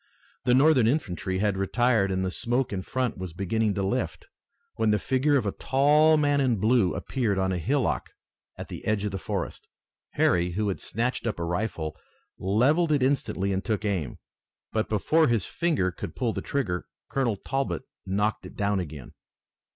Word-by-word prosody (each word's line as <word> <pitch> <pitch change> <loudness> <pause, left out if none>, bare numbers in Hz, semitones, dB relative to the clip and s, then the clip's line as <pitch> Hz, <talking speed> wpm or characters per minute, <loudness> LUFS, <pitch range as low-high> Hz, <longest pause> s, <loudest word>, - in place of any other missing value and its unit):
The 125 - +4
Northern 135 -4 +5
infantry 95 - -1
had 100 0 +1
retired 110 +1 +2
and 95 0 0
the 95 - -2
smoke 120 +4 0
in 95 - -2
front 125 +1 -2
was 90 -3 -5
beginning 100 +3 0
to 100 - -1
lift, 95 - -2 0.5
when 110 -1 +2
the 105 - +4
figure 135 +6 +2
of 125 - -1
a 100 - 0
tall 150 +6 +4
man 145 -1 +2
in 130 -3 +2
blue 110 -2 +2
appeared 115 -7 -1
on 95 0 +1
a 90 - -1
hillock 135 - 0 0.5
at - - -7
the - - -8
edge 105 -1 +1
of 105 - -2
the 95 - -4
forest. - - -4 0.5
Harry, 90 0 +2
who 105 +2 0
had 95 - -3
snatched 120 +2 -2
up 105 - -2
a - - -2
rifle, 85 -3 -2 0.4
levelled 135 - +2
it 145 -3 +3
instantly 100 -8 0
and 95 +1 -1
took 110 -2 -1
aim. 90 -10 -2 0.6
But 110 -1 0
before 155 +10 +3
his 115 -6 +1
finger 155 - 0
could - - -7
pull 120 -4 0
the - - -3
trigger 100 -12 -2 0.2
Colonel 125 -6 0
Talbot 135 +5 -2 0.2
knocked 105 +3 -1
it - - -14
down 100 -1 0
again. 75 -7 -7
110 Hz, 180 wpm, -27 LUFS, 95-130 Hz, 0.6 s, Northern